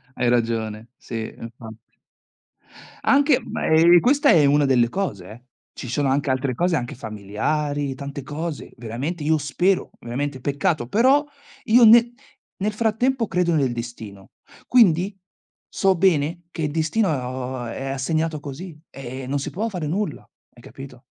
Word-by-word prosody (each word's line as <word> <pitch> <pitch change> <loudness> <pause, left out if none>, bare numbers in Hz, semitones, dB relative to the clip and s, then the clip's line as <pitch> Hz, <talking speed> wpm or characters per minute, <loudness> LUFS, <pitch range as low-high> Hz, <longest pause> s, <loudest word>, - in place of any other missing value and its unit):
Hai 120 -1 +1
ragione, 115 -2 -1
sì. 115 -2 -6
Infatti 115 -1 -12 1.1
Anche, 280 -1 +4
me 165 +2 +4
questa 280 +4 +3
è 160 -3 +6
una 145 +1 +4
delle 120 -3 +3
cose, 105 - -4
eh. 120 +3 -12 0.4
Ci 125 - -6
sono 135 +3 0
anche 135 +1 0
altre 130 0 0
cose 175 +5 +1
anche 120 -5 -3
familiari, 135 +6 -3
tante 140 +1 -7
cose, 150 +3 -6
veramente 130 +8 -5
io 155 +1 +2
spero, 175 +7 0
ovviamente 130 +2 -4
peccato, 140 -2 -1
però 260 - +4 0.4
io 240 +2 +5
ne 235 +2 +7 0.4
nel 210 +2 -1
frattempo 230 +2 0
credo 175 -1 +1
nel 135 -5 +1
destino. 115 -5 -8 0.4
Quindi, 195 -4 +3 0.5
so 190 -1 +2
bene 170 -1 +1
che 160 - -4
il 150 - -1
destino 165 +7 0
o 130 -2 -3
a 120 -1 -5
è 135 - -6
assegnato 155 +3 -2
così 150 +4 -8
e 130 -1 -8
e 130 - -7
non 140 +1 -1
si 140 - -4
può 220 +5 -2
fare 175 -7 -4
nulla. 180 -1 -3 0.3
Hai 120 - -17
capito? 130 0 -12
145 Hz, 155 wpm, -22 LUFS, 125-180 Hz, 1.1 s, ne